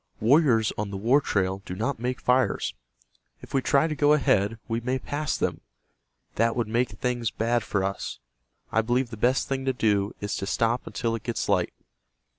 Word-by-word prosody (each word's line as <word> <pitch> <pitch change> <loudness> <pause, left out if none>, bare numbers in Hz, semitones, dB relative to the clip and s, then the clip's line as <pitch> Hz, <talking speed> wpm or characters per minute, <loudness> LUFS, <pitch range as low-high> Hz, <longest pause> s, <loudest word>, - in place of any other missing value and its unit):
Warriors 120 -2 +4
on 105 -1 -2
the 100 - -5
war 120 +8 +3
trail 95 -5 0
do 90 - -6
not 115 +6 -2
make 125 +1 -2
fires. 125 - +1 0.7
If - - -12
we 135 - +2
try 140 +3 +3
to 160 - -1
go 145 0 +4
ahead, 115 -6 +2
we 115 0 -1
may 125 +2 -1
pass 145 +3 -2
them. - - -1 0.8
That 115 +1 +2
would 120 -3 0
make 120 +3 +1
things 120 +2 -2
bad 120 +1 0
for 100 -2 -1
us. 100 +1 -3 0.5
I 115 - +3
believe 120 +2 0
the - - -5
best 125 +5 +1
thing 135 -1 -2
to 130 - +1
do 105 -4 +1
is 105 0 -3
to 95 - -4
stop 115 +4 0
until 115 -2 -2
it 115 - -3
gets 120 +1 -3
light." - - +2
115 Hz, 195 wpm, -26 LUFS, 105-130 Hz, 0.8 s, Warriors